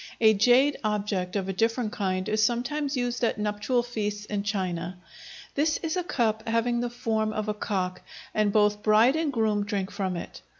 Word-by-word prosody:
A 220 -1 +6
jade 245 +7 +4
object 205 -3 -1
of 195 -2 -1
a 195 - -2
different 225 +3 0
kind 185 -2 -2
is 215 0 +1
sometimes 270 +5 0
used 245 0 -2
at 230 - +1
nuptial 210 +4 0
feasts 210 -3 -3
in 210 -1 -2
China. 185 -4 -3 0.6
This 305 +2 +1
is 325 +1 -1
a 365 - 0
cup 225 -8 -1
having 230 +1 +1
the 240 0 -1
form 225 -3 -1
of 215 -1 -3
a 210 - 0
cock, 185 -3 -2 0.3
and 215 -1 +2
both 210 0 +3
bride 220 +6 +5
and 320 -2 0
groom 220 -4 +1
drink 200 -2 -3
from 190 -3 -2
it. - - -8
215 Hz, 185 wpm, -27 LUFS, 205-240 Hz, 0.6 s, A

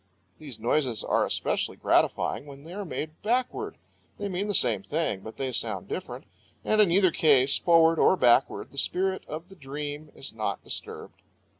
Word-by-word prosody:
These 140 -7 -7
noises 120 0 +1
are - - +1
especially - - -1
gratifying 145 - +1
when 140 0 -12
they 165 +3 -10
are 205 +1 -4
made 155 -3 -6
backward. 255 - -1 0.4
They 205 0 -4
mean 190 +2 -2
the 205 - -1
same 115 - +2
things, 125 -7 -2
but 110 - -9
they 135 -1 -2
sound - - -1
different. - - -6 0.4
And 215 0 +4
in 205 - +5
either 185 +1 +4
case, 140 -4 +4
forward 165 -1 +4
or 190 - +5
backward, 125 -1 +3
the 140 - -4
spirit 190 +4 0
of 160 +3 -7
the 195 - -15
dream 145 0 -6
is 135 - -7
not 105 -3 -3
disturbed. - - -6
155 Hz, 175 wpm, -27 LUFS, 135-185 Hz, 0.4 s, in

